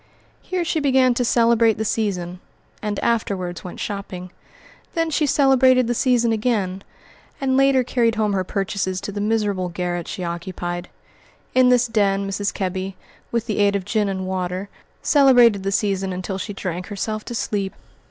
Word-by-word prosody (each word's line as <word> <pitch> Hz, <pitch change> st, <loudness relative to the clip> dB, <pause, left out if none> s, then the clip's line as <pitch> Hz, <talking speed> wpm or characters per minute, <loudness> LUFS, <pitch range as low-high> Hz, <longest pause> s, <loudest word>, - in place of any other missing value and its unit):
Here 365 Hz, -2 st, -2 dB
she 320 Hz, -, 0 dB
began 265 Hz, -3 st, +3 dB
to 245 Hz, -, 0 dB
celebrate 230 Hz, -2 st, +3 dB
the 220 Hz, -, -2 dB
season, 185 Hz, -5 st, -2 dB, 0.4 s
and 210 Hz, -2 st, -2 dB
afterwards 190 Hz, -6 st, -1 dB
went 180 Hz, -, -8 dB
shopping; 185 Hz, -3 st, -5 dB, 0.6 s
then 330 Hz, -1 st, 0 dB
she 300 Hz, 0 st, +1 dB
celebrated 260 Hz, -2 st, +4 dB
the 240 Hz, -, 0 dB
season 240 Hz, -1 st, +2 dB
again, 210 Hz, -4 st, -1 dB, 0.6 s
and 265 Hz, -1 st, +1 dB
later 270 Hz, -1 st, +4 dB
carried 235 Hz, -2 st, +1 dB
home 215 Hz, -2 st, +1 dB
her 190 Hz, -1 st, 0 dB
purchases 190 Hz, -1 st, -2 dB
to 205 Hz, -, -5 dB
the 205 Hz, 0 st, -4 dB
miserable 205 Hz, -4 st, 0 dB
garret 175 Hz, -1 st, -3 dB
she 185 Hz, -, -5 dB
occupied. 175 Hz, +1 st, -4 dB, 0.6 s
In 255 Hz, 0 st, +5 dB
this 250 Hz, -1 st, +4 dB
den 200 Hz, -4 st, +1 dB
Mrs. 200 Hz, +1 st, -1 dB
Kebby, 190 Hz, 0 st, -3 dB, 0.4 s
with 235 Hz, -1 st, -1 dB
the 215 Hz, -3 st, -2 dB
aid 200 Hz, 0 st, +3 dB
of 195 Hz, -2 st, -2 dB
gin 210 Hz, 0 st, 0 dB
and 190 Hz, -1 st, -3 dB
water, 185 Hz, +1 st, -3 dB, 0.3 s
celebrated 245 Hz, -8 st, +5 dB
the 195 Hz, +1 st, -2 dB
season 195 Hz, -1 st, 0 dB
until 185 Hz, +1 st, -4 dB
she 205 Hz, -, -5 dB
drank 180 Hz, -2 st, -4 dB
herself 215 Hz, +1 st, -3 dB
to 240 Hz, -, -5 dB
sleep. 200 Hz, -3 st, -2 dB
205 Hz, 165 wpm, -22 LUFS, 190-235 Hz, 0.6 s, In